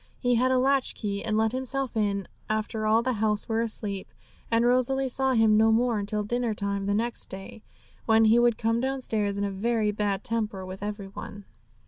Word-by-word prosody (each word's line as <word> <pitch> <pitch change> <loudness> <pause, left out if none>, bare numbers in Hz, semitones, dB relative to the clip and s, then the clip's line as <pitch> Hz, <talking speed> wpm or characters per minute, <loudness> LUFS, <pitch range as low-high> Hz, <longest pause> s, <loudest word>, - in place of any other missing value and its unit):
He 245 -1 +1
had 250 +2 +3
a 260 - +3
latch 270 +1 +2
key, 200 -2 -3
and 215 -1 -1
let 220 0 +2
himself 260 0 -3
in 200 -3 0 0.2
after 215 0 -1
all 220 +2 +4
in - - -7
the 255 +1 0
house 210 -1 0
were 225 0 0
asleep; 210 -4 -3 0.4
and 230 +1 +2
Rosalie 255 +2 +2
saw 265 +1 +1
him 225 -2 +4
no 220 +1 +5
more 230 0 +2
until 210 +1 -2
dinner 235 +1 -1
time 200 -1 -2
the 200 - +1
next 235 +2 -2
day, 195 +3 -8 0.5
when 225 0 +5
he 225 +2 +5
would 240 -2 +3
come 230 +1 0
downstairs 225 -6 -1
in 200 - -1
a 200 - -1
very 215 +2 0
bad 205 -1 -2
temper 215 -4 -2
with 185 +1 -8
every 205 -1 -5
one. 200 +1 -9
220 Hz, 205 wpm, -27 LUFS, 205-240 Hz, 0.5 s, no